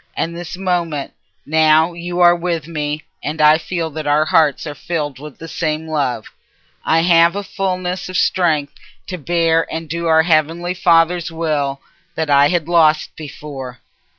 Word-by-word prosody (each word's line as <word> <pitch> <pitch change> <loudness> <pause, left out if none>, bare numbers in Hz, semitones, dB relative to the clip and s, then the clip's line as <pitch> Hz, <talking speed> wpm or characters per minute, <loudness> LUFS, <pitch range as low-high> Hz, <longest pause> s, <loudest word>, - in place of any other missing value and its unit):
And 170 +1 -2
this 175 +1 -7
moment, 175 -6 -2 0.3
now 160 +2 +3
you 175 +1 -4
are 175 0 +6
with 170 -3 -3
me, 150 -2 -4 0.2
and 155 +1 -4
I 155 +1 +5
feel 165 -1 -4
that 155 0 -6
our 150 +1 +3
hearts 155 -2 +2
are 150 - -5
filled 145 -2 -4
with 150 -1 -10
the 165 - -9
same 160 -1 -3
love. 135 -8 -2 0.6
I 165 +1 +2
have 170 0 +4
a 205 - -3
fulness 185 -2 -3
of 185 - -3
strength 160 -6 +1 0.3
to 180 -1 -6
bear 165 +1 +1
and 165 0 -5
do 170 +2 -3
our 160 0 +4
heavenly 165 +2 +1
Father's 170 -1 +2
Will 150 -4 -2 0.3
that 160 -2 -2
I 140 0 +6
had 170 -1 -1
lost 160 -3 +2
before." 140 -4 -8
160 Hz, 165 wpm, -18 LUFS, 150-175 Hz, 0.6 s, are